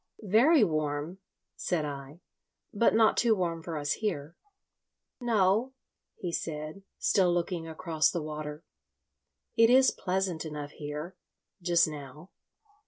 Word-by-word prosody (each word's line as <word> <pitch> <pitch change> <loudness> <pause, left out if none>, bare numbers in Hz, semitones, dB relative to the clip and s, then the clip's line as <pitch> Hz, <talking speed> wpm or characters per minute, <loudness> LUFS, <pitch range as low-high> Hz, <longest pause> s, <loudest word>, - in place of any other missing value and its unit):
"Very 265 +6 +6
warm," 155 0 -1 0.4
said 165 -4 -1
I; 140 +3 -7 0.5
"but 220 +2 +3
not 225 -1 +4
too 230 -2 +4
warm 170 -4 -2
for 165 -1 -5
us 145 0 -2
here." 165 -7 -2 0.8
"No," 225 +1 +2 0.4
he 175 - -4
said, 155 +2 -4 0.2
still 185 -4 +3
looking 175 -1 -1
across 160 -1 +1
the 170 - -3
water, 150 0 -6 0.9
"it 230 0 +6
is 260 +1 +6
pleasant 185 -3 -2
enough 150 -2 -6
here.... 150 +4 -6 0.4
just 170 -1 +4
now." 150 +3 -9
170 Hz, 120 wpm, -29 LUFS, 150-195 Hz, 0.9 s, Very